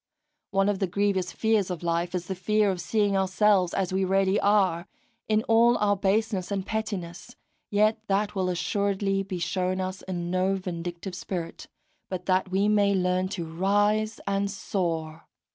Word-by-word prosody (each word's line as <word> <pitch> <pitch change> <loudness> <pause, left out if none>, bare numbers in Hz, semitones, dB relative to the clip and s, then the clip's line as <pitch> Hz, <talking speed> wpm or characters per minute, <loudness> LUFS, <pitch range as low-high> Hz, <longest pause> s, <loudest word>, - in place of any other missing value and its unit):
One 195 0 +2
of 205 -2 0
the 195 - 0
grievous 190 -1 0
fears 220 -2 +1
of 180 -2 -5
life 170 +1 -1
is 180 -1 -3
the 190 - -3
fear 205 +3 +1
of 180 -2 -4
seeing 200 +3 +1
ourselves 190 -1 +3
as 185 -2 -1
we 190 0 +1
really 195 +1 +2
are, 195 -4 +2 0.4
in 215 0 +2
all 235 +1 +4
our 205 -1 +2
baseness 200 -1 0
and 195 -2 -2
pettiness; 210 -1 -5 0.3
yet 215 +1 +2
that 200 +1 0
will 190 -2 -1
assuredly 195 +2 0
be 195 -1 -5
shown 185 +1 -1
us 185 0 -4
in 175 -2 -4
no 185 +1 +1
vindictive 175 0 -5
spirit, 180 -2 -5 0.4
but 180 -1 -5
that 185 0 +1
we 195 +2 +1
may 205 -1 +3
learn 180 0 +1
to 185 -3 -4
rise 205 +5 +1
and 200 0 0
soar. 165 -5 -3
190 Hz, 165 wpm, -26 LUFS, 180-205 Hz, 0.4 s, all